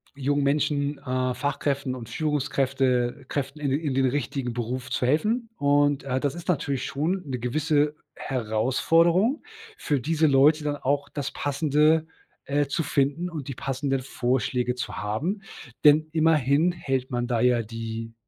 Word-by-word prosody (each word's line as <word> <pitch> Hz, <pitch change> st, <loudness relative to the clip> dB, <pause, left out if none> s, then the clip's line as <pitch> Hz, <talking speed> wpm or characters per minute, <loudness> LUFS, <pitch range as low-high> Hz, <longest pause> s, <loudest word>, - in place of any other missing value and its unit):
jungen 145 Hz, +1 st, 0 dB
Menschen, 145 Hz, 0 st, +1 dB
äh, 130 Hz, -2 st, -1 dB
Fachkräften 140 Hz, 0 st, -2 dB
und 120 Hz, -3 st, -8 dB
Führungskräfte 135 Hz, -3 st, 0 dB
Kräften 140 Hz, +1 st, -3 dB
in 145 Hz, -2 st, -1 dB
den 140 Hz, -, +1 dB
in 145 Hz, -4 st, -1 dB
den 135 Hz, 0 st, +2 dB
richtigen 130 Hz, -1 st, -2 dB
Beruf 125 Hz, +2 st, -4 dB
zu 125 Hz, -, -1 dB
helfen. 215 Hz, -, +1 dB
Und, 145 Hz, 0 st, +2 dB
äh, 130 Hz, -1 st, -1 dB
das 140 Hz, 0 st, -1 dB
ist 175 Hz, +1 st, -9 dB
natürlich 140 Hz, -6 st, -1 dB
schon 175 Hz, +7 st, -1 dB
'ne 125 Hz, -, -3 dB
gewisse 150 Hz, +4 st, +1 dB, 0.2 s
Herausforderung 165 Hz, -, +1 dB, 0.3 s
für 145 Hz, -2 st, 0 dB
diese 155 Hz, +4 st, +2 dB
Leute 145 Hz, +3 st, +4 dB
dann 145 Hz, -1 st, -1 dB
auch 145 Hz, +1 st, -1 dB
das 145 Hz, -3 st, -4 dB
Passende, 150 Hz, +2 st, +2 dB, 0.4 s
äh, 145 Hz, +1 st, +1 dB
zu 150 Hz, +4 st, -1 dB
finden 145 Hz, +5 st, 0 dB
und 155 Hz, -6 st, -6 dB
die 135 Hz, -, -4 dB
passenden 135 Hz, +1 st, -2 dB
Vorschläge 125 Hz, -1 st, -1 dB
zu 125 Hz, -, -5 dB
haben, 135 Hz, -, -2 dB, 0.4 s
denn 150 Hz, +1 st, +6 dB
immerhin 155 Hz, 0 st, +3 dB
hält 135 Hz, -7 st, -2 dB
man 120 Hz, -1 st, -1 dB
da 120 Hz, -2 st, 0 dB
ja 125 Hz, -1 st, +3 dB
die 115 Hz, 0 st, -6 dB
140 Hz, 155 wpm, -25 LUFS, 125-150 Hz, 0.4 s, denn